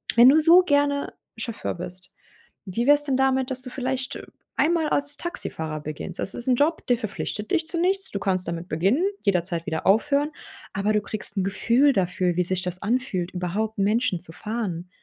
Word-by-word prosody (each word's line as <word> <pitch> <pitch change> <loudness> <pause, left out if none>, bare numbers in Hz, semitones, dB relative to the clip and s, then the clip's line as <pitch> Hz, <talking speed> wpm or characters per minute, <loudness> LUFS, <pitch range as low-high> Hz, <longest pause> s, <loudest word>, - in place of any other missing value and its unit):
wenn 240 +2 +8
du 310 +3 +6
so 335 +3 +8
gerne 285 -3 +1 0.2
Chauffeur 225 0 -4
bist, 180 +1 -7 0.5
wie 210 +6 -2
wär's 290 0 +6
denn 270 -3 0
damit, 265 -1 +2
dass 255 - -2
du 255 - -5
vielleicht, 260 0 -3
äh, - - -10 0.3
ein 330 +3 +3
mal 320 -3 0
als 285 0 +2
Taxifahrer 160 - -4
beginnst? 155 +4 -6
Das - - -1
ist 240 - -3
'n 250 - +4
Job, 300 +6 +1
der 245 - +3
verpflichtet 215 -1 -5
dich 320 -1 +1
zu 335 - -1
nichts, 385 +2 +1
du 200 - -3
kannst 185 -2 0
damit 170 +1 -4
beginnen, 195 - +1 0.2
jederzeit 175 -4 0
wieder 160 - -3
aufhören, 285 +8 +3 0.4
aber 205 +2 0
du 210 - +2
kriegst 210 -1 -2
'n 190 - +1
Gefühl 240 +8 +3
dafür, 180 -2 0
wie 180 - +2
sich 185 +1 -1
das 180 0 -4
anfühlt, 205 -6 -1
überhaupt 195 +5 -3
Menschen 215 0 +1
zu 165 -1 -3
fahren, 190 -4 -4
220 Hz, 195 wpm, -24 LUFS, 180-280 Hz, 0.5 s, wenn